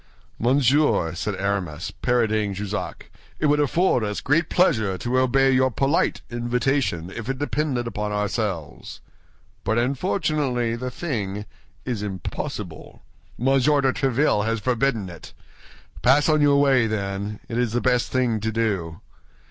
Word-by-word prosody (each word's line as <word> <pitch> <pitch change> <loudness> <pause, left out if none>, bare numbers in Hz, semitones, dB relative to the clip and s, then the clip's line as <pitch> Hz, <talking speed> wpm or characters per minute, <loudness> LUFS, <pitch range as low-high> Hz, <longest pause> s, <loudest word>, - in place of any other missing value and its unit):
"Monsieur," 130 - +3
said 100 +3 -3
Aramis, 95 -5 -2
parodying 110 -5 0
Jussac, 105 +1 -5 0.3
"it - - 0
would 150 0 +3
afford 145 -3 +2
us 105 -1 -2
great 160 +4 +1
pleasure 110 - +2
to 125 +6 0
obey 135 +1 +3
your 130 0 +3
polite 135 +6 +1
invitation 120 - -1
if 115 +2 -6
it 135 - -1
depended 145 -3 -1
upon 105 -2 -3
ourselves; 100 - -3 0.6
but 110 - 0
unfortunately 135 -3 0
the 125 +2 -4
thing 105 - -4 0.4
is 120 -5 -2
impossible—Monsieur 130 - -2
de 135 -1 +2
Tréville 135 -4 +1
has 115 +1 -1
forbidden 120 -3 0
it. 85 -3 -11 0.7
Pass 140 +4 +4
on 155 -1 +3
your 140 -1 +5
way, 135 -5 +4
then; 100 -1 -3
it 120 0 -2
is 120 -3 0
the 120 - +2
best 125 -1 +1
thing 125 -4 +1
to 110 +2 -2
do." 100 -8 -2
120 Hz, 135 wpm, -23 LUFS, 105-135 Hz, 0.7 s, your